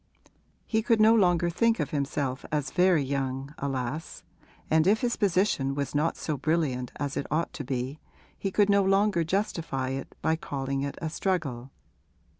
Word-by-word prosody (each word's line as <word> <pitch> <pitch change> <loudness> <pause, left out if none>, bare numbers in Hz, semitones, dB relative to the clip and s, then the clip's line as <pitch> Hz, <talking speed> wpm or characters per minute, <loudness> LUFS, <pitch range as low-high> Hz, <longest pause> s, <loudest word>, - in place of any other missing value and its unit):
He 220 -1 +1
could 230 0 +2
no 220 +1 +7
longer 175 -5 +3
think 230 +5 +2
of - - -2
himself 140 -3 -2
as 150 -3 -1
very 180 -4 +4
young, 135 0 -3
alas, 135 +2 -4 0.4
and 160 +2 +3
if 210 +3 +4
his 245 -2 +1
position 180 -9 +1
was 140 -1 -3
not 150 +3 +1
so 155 -3 -3
brilliant 140 -4 0
as 140 -1 -3
it - - -2
ought 160 +3 -1
to 145 - -5
be 130 +2 -3 0.4
he 195 - -3
could 205 +1 +3
no 200 0 +4
longer 195 -2 +3
justify 165 -7 -1
it 135 +1 -5
by 160 - +3
calling 135 -3 -3
it 140 0 -4
a 160 - -1
struggle. 150 -10 -2
155 Hz, 170 wpm, -28 LUFS, 135-190 Hz, 0.4 s, no